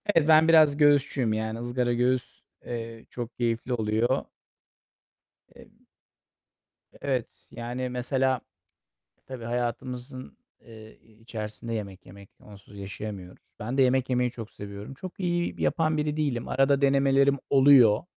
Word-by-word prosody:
Ev 160 -2 +4
ben 160 0 +6
biraz 155 -3 +6
göğüsçüyüm. 140 -5 +3
Yani, 110 +1 -3
ızgara 120 0 -1
göğüs, 125 +1 -1 0.2
eee, 115 -1 -6
çok 120 -1 -7
keyifli 120 +1 -1
oluyor. 115 +3 0 1.3
Eee - - -19 1.1
Evet, 130 -4 -1 0.2
yani, 120 +2 -4
mesela, 130 0 0 0.9
tabii 130 -3 -8
hayatımızın, 125 +2 -5 0.2
eee, 110 -2 -14 0.2
içerisinde 115 0 -6
yemek 100 -4 -6
yemek. 100 +1 -14
Onsuz 100 0 -15
yaşayamıyoruz. 100 -2 -8
Ben 120 +6 -4
de - - +6
yemek 130 0 +2
yemeyi 125 -1 +1
çok 115 -3 -9
seviyorum. 100 +4 -9
Çok 185 +7 -9
iyi 175 -1 -1
yapan 160 -1 +1
biri 150 0 -1
değilim. 140 -6 -1
Arada 135 +1 +2
denemelerim 140 0 +3
oluyor. 135 -6 +6
125 Hz, 120 wpm, -27 LUFS, 115-135 Hz, 1.3 s, ben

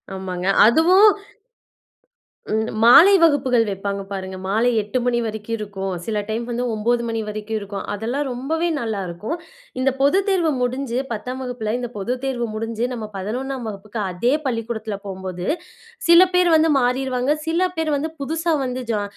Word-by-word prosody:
ஆமாங்க. 185 -1 -4 0.2
அதுவும் 360 - +6 1.4
ம். 220 +1 0 0.2
மாலை 315 +12 +9
வகுப்புகள் 265 -7 +4
வைப்பாங்க 200 0 -3
பாருங்க, 190 -1 -5
மாலை 220 +5 +2
8 210 +5 -2
மணி 240 -1 +2
வரைக்கும் 220 +1 -4
இருக்கும். 195 -3 -5
சில 215 -2 -1
டைம் 225 +2 -2
வந்து 240 +1 -2
9 235 +3 +1
மணி 225 0 -2
வரைக்கும் 215 +1 -4
இருக்கும். 200 -1 -6
அதெல்லாம் 235 +8 -2
ரொம்பவே 310 +7 -1
நல்லா 220 -6 -3
இருக்கும். 175 - -4 0.4
இந்த 260 +1 +2
பொதுத்தேர்வு 365 +3 +2
முடிஞ்சு, 250 0 -1
10ம் 250 +4 -5
வகுப்புல 245 -4 -3
இந்த 245 -2 -5
பொதுத்தேர்வு 250 +3 -2
முடிஞ்சு, 225 +2 -2
நம்ம 225 -3 -5
11ம் 245 +6 -4
வகுப்புக்கு 210 +2 -6
அதே 210 +8 0
பள்ளிக்கூடத்துல 230 -3 -3
போம்போது 185 -2 -5 0.6
சில 340 +1 +9 0.2
பேர் 360 -1 +4
வந்து 320 +1 +3
மாறிருவாங்க, 255 +2 +1
சில 350 +3 +2
பேர் 315 -2 0
வந்து 310 +3 -2
புதுசா 325 +3 0
வந்து 255 0 -3
ஜா 210 -2 0
235 Hz, 145 wpm, -21 LUFS, 210-270 Hz, 1.4 s, மாலை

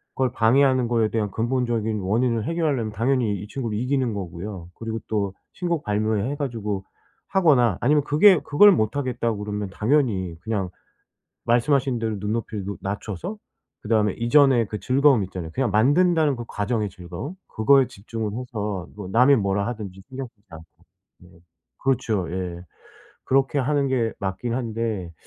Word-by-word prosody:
걸 130 -2 +1
방해하는 130 +2 +3
거에 115 -2 +2
대한 105 -3 -1
근본적인 115 -2 -1
원인을 115 +4 +1
해결하려면 150 -10 -1
당연히 115 -1 0
이 105 - -8
친구를 115 -3 -4
이기는 125 -1 0
거고요. 90 -1 -6
그리고 115 0 -4
또 100 -3 -1 0.2
신곡 170 -4 -2
발매해 110 +4 0
가지고 110 -9 -3 0.5
하거나 135 - +3
아니면 145 +3 +3
그게 165 +6 +6
그걸 175 +9 +6
못하겠다고 120 - -1
그러면 105 -1 -4
당연히 105 - +1
그냥 105 -5 -2 0.8
말씀하신 125 +1 +2
대로 110 -2 -2
눈높이를 105 0 -3
높 100 +1 -5
낮춰서 105 - -5 0.5
그다음에 105 -2 +2
이전의 120 -1 +4
그 105 - -4
즐거움 135 -4 +3
있잖아요. 90 -3 -7
그냥 130 -4 0
만든다는 150 +5 +3
그 120 - -6
과정의 105 0 -1
즐거움, 90 - -7
그거에 135 +4 +4
집중을 110 +1 -5
해서 105 -7 -4
뭐 100 -3 -7
남이 125 +7 +5
뭐라 100 -1 0
하든지 100 -5 -7
신경 135 -1 -6
쓰지 110 -4 -37
않고 80 0 -11 0.6
네. 90 - -16 0.5
그렇죠. 110 -8 0
예. 90 -2 -4 0.6
그렇게 135 +2 +2
하는 140 +1 +1
게 120 -4 0
맞긴 100 +5 -3
한데 115 -7 -3
115 Hz, 350 characters per minute, -24 LUFS, 105-135 Hz, 0.8 s, 그게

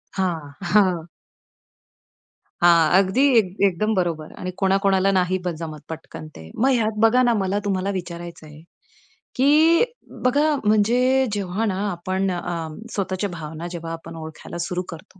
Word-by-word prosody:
हां, 165 -7 -2 0.2
हां. 180 -5 +3 1.6
हां, 170 -3 +6
अगदी 200 +8 +2
एक 190 -3 +1
एकदम 215 +4 0
बरोबर 165 -4 -2
आणि 185 0 -3
कोणाकोणाला 195 0 +3
नाही 185 +1 +1
ब - - +1
जमत 155 -2 -6
पटकन 160 -1 -8
ते. 80 0 -11
मग 265 +4 +2
ह्यात 220 -3 0
बघा 245 +3 +5
ना 240 -1 +3
मला 195 +2 0
तुम्हाला 195 0 -1
विचारायच 170 -2 -8
आहे, 150 0 -13 0.7
की 310 - +5 0.4
बघा 290 +4 +3
म्हणजे 215 +3 +3 0.3
जेव्हा 200 +2 -2
ना 185 - -3
आपण 185 +2 -2
अ, 175 0 -3 0.4
स्वतःच्या 195 0 -2
भावना 160 0 -7
जेव्हा 165 -1 -6
आपण 165 0 -9
ओळखायला 160 +2 -8
सुरू 180 0 -2
करतो, 170 +3 -11
185 Hz, 140 wpm, -22 LUFS, 170-210 Hz, 1.6 s, हां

